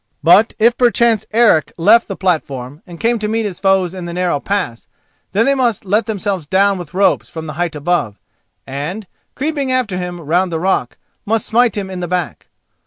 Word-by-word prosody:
But 185 Hz, +7 st, +5 dB
if 230 Hz, +2 st, +4 dB
perchance 235 Hz, -3 st, +2 dB
Eric 220 Hz, -9 st, +3 dB
left 215 Hz, +7 st, +4 dB
the 195 Hz, -, -5 dB
platform 145 Hz, -7 st, -2 dB
and 175 Hz, -1 st, -11 dB
came 235 Hz, 0 st, +1 dB
to 210 Hz, -, -2 dB
meet 225 Hz, +1 st, -1 dB
his 195 Hz, -4 st, -5 dB
foes 190 Hz, -2 st, +2 dB
in 185 Hz, -2 st, -7 dB
the 170 Hz, -, -6 dB
narrow 180 Hz, -4 st, 0 dB
pass, 180 Hz, -, -3 dB, 0.4 s
then 225 Hz, +4 st, +2 dB
they 275 Hz, -, +3 dB
must 240 Hz, -7 st, 0 dB
let 210 Hz, +5 st, +1 dB
themselves 200 Hz, -6 st, -2 dB
down 195 Hz, +2 st, +2 dB
with 175 Hz, 0 st, -9 dB
ropes 195 Hz, +1 st, +2 dB
from 160 Hz, -1 st, -7 dB
the 155 Hz, -, -6 dB
height 170 Hz, 0 st, -2 dB
above, 150 Hz, -, -1 dB, 0.5 s
and, 150 Hz, +10 st, -5 dB, 0.3 s
creeping 280 Hz, -1 st, -2 dB
after 245 Hz, -8 st, 0 dB
him 180 Hz, -1 st, -5 dB
round 175 Hz, +4 st, 0 dB
the 165 Hz, -, -2 dB
rock, 190 Hz, +3 st, -1 dB, 0.3 s
must 220 Hz, +1 st, 0 dB
smite 235 Hz, -1 st, +2 dB
him 195 Hz, -2 st, -4 dB
in 185 Hz, -, -5 dB
the 175 Hz, -, -3 dB
back. 180 Hz, 0 st, -3 dB
190 Hz, 195 wpm, -17 LUFS, 170-220 Hz, 0.5 s, But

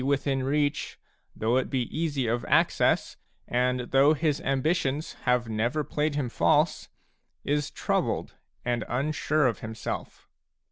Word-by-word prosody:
within 140 Hz, 0 st, +1 dB
reach, 145 Hz, +2 st, 0 dB, 0.4 s
though 115 Hz, +3 st, +1 dB
it 130 Hz, -, 0 dB
be 130 Hz, -2 st, 0 dB
easy 150 Hz, -5 st, 0 dB
of 120 Hz, +1 st, 0 dB
access, -, -, +2 dB, 0.3 s
and 125 Hz, +1 st, +1 dB
though 140 Hz, +3 st, +5 dB
his 150 Hz, 0 st, 0 dB
ambitions 140 Hz, +1 st, 0 dB
have 125 Hz, -1 st, +2 dB
never 115 Hz, +7 st, 0 dB
played 150 Hz, +1 st, -1 dB
him 145 Hz, -4 st, 0 dB
false, 120 Hz, -, +2 dB, 0.5 s
is 145 Hz, 0 st, 0 dB
troubled -, -, -1 dB, 0.3 s
and 120 Hz, -1 st, 0 dB
unsure 150 Hz, +3 st, +1 dB
of 115 Hz, -5 st, +1 dB
himself. 110 Hz, 0 st, -6 dB
135 Hz, 130 wpm, -27 LUFS, 125-150 Hz, 0.5 s, though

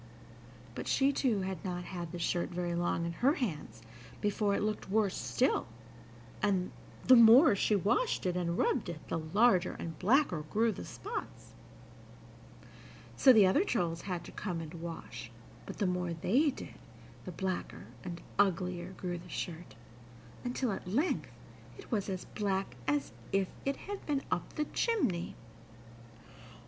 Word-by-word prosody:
But -, -, -6 dB
she 275 Hz, +1 st, +3 dB
too 235 Hz, -8 st, +1 dB
had 190 Hz, -2 st, -4 dB
not 180 Hz, -2 st, -3 dB
had 175 Hz, -2 st, -6 dB
the 175 Hz, -, -5 dB
shirt 175 Hz, +1 st, 0 dB
very 175 Hz, 0 st, -2 dB
long 170 Hz, -1 st, 0 dB
in 170 Hz, -, -2 dB
her 260 Hz, -, +3 dB
hands 150 Hz, -, -4 dB, 0.4 s
before 205 Hz, 0 st, +1 dB
it -, -, -1 dB
looked 215 Hz, -2 st, -2 dB
worse 205 Hz, -1 st, +2 dB
still, -, -, +1 dB, 0.7 s
and, 190 Hz, -3 st, +1 dB, 0.3 s
the 255 Hz, -, +9 dB
more 235 Hz, +2 st, +8 dB
she 210 Hz, +2 st, +2 dB
washed 215 Hz, -, +1 dB
it 180 Hz, -1 st, 0 dB
and 170 Hz, -1 st, -1 dB
rubbed -, -, +1 dB
it, 165 Hz, -2 st, -7 dB
the -, -, -1 dB
larger 185 Hz, +3 st, +3 dB
and 165 Hz, -1 st, -7 dB
blacker 215 Hz, -, +3 dB
grew 225 Hz, +2 st, +2 dB
the -, -, -7 dB
spots. 430 Hz, +4 st, -7 dB, 1.6 s
So 265 Hz, -, +7 dB
the 215 Hz, -5 st, +7 dB
other 190 Hz, -, +4 dB
trolls 175 Hz, -, -1 dB
had 180 Hz, -3 st, -4 dB
to -, -, -10 dB
come 180 Hz, -5 st, -4 dB
and 160 Hz, -1 st, -7 dB
wash, 165 Hz, -9 st, -7 dB, 0.4 s
but, -, -, -7 dB
the 205 Hz, -, +1 dB
more 180 Hz, -1 st, -1 dB
they 240 Hz, -, +2 dB
did, 265 Hz, -, -7 dB, 0.5 s
the 185 Hz, -, -5 dB
blacker 185 Hz, +1 st, -4 dB, 0.2 s
and 170 Hz, -1 st, -6 dB, 0.2 s
uglier 180 Hz, -2 st, +1 dB
grew 175 Hz, -2 st, -4 dB
the 180 Hz, +1 st, -13 dB
shirt, 170 Hz, 0 st, -5 dB, 0.7 s
until 250 Hz, -1 st, -1 dB
at 190 Hz, -, -5 dB
length 275 Hz, -, 0 dB, 0.5 s
it -, -, -13 dB
was 210 Hz, -4 st, 0 dB
as 185 Hz, -2 st, -4 dB
black 195 Hz, -, -2 dB
as 145 Hz, -3 st, 0 dB, 0.2 s
if 195 Hz, -1 st, +1 dB, 0.2 s
it 275 Hz, 0 st, +1 dB
had 405 Hz, 0 st, -7 dB
been 285 Hz, -2 st, 0 dB
up -, -, -2 dB
the 300 Hz, -, 0 dB
chimney. 255 Hz, -, 0 dB
190 Hz, 155 wpm, -32 LUFS, 175-225 Hz, 1.6 s, the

